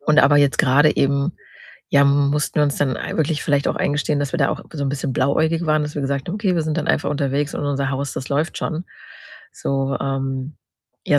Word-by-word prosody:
Und 150 +1 +2
aber 145 - +5
jetzt 145 -1 +3
grade 145 +4 +4
eben, 140 +4 +1 0.6
ja, 140 0 +4
mussten 140 0 +1
wir 150 - +4
uns 145 -1 +1
dann 135 -3 0
ei - - -5
wirklich 155 -1 0
vielleicht 140 -1 +1
auch - - -1
eingestehen, 145 0 0
dass 140 -1 -2
wir 170 - -1
da 135 - +3
auch - - -4
so 145 -3 -3
'n - - 0
bisschen 140 -1 -3
blauäugig 160 +3 +1
waren, 155 0 +2
dass 150 0 -5
wir 145 - -1
gesagt 140 +2 -2
haben: 185 - -2
„Okay, 200 -4 0
wir 165 - +1
sind 155 0 -2
dann 155 - -2
einfach - - +1
unterwegs 145 0 -1
und - - -3
unser 140 -1 -1
Haus, 135 0 -3
das 130 - -6
läuft 150 +4 -1
schon.“ 165 +3 -3 0.7
So, 135 0 -1
ähm 135 +1 -3 0.5
ja, 145 - +4
145 Hz, 230 wpm, -21 LUFS, 140-150 Hz, 0.7 s, aber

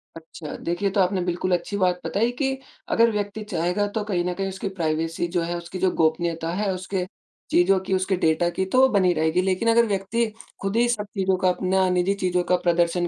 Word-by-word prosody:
अच्छा। 160 -1 -9
देखिए, 175 +4 -2
ये - - 0
तो 200 - +3
आपने 185 0 +1
बिल्कुल 180 +1 -1
अच्छी 180 +3 -1
बात 180 -2 +1
बताई 230 +4 +1
कि, 270 -2 0 0.3
अगर 230 0 +4
व्यक्ति 210 0 -3
चाहेगा 180 +3 0
तो 220 - 0
कहीं 190 -4 -1
न 180 - -1
कहीं 195 +2 -3
उसकी 190 +1 -4
प्राइवेसी 165 +1 -1
जो 175 - +3
है, 170 +1 -2
उसकी 170 +2 -7
जो 185 -1 +2
गोपनीयता 165 +1 0
है, 200 +1 0
उसके 185 0 -3 0.5
चीज़ों 185 +2 +4
की, 190 0 -3
उसके 185 +1 +1
डेटा 165 +1 +2
की 190 +2 -2
तो 255 +7 +1
वो 265 - +7
बनी 185 -3 +4
रहेगी। 160 +2 +1
लेकिन 190 +4 0
अगर 235 +1 +5
व्यक्ति 200 +3 0 0.4
खुद 195 +1 -2
ही 240 - +4
सब 215 -3 -1
चीज़ों 190 -1 +2
का 185 - +5
अपना 185 +1 +1
निज़ी 180 +2 +2
चीज़ों 180 -1 +1
का 180 - +6
प्रदर्शन 175 0 +2
185 Hz, 220 wpm, -24 LUFS, 175-200 Hz, 0.5 s, वो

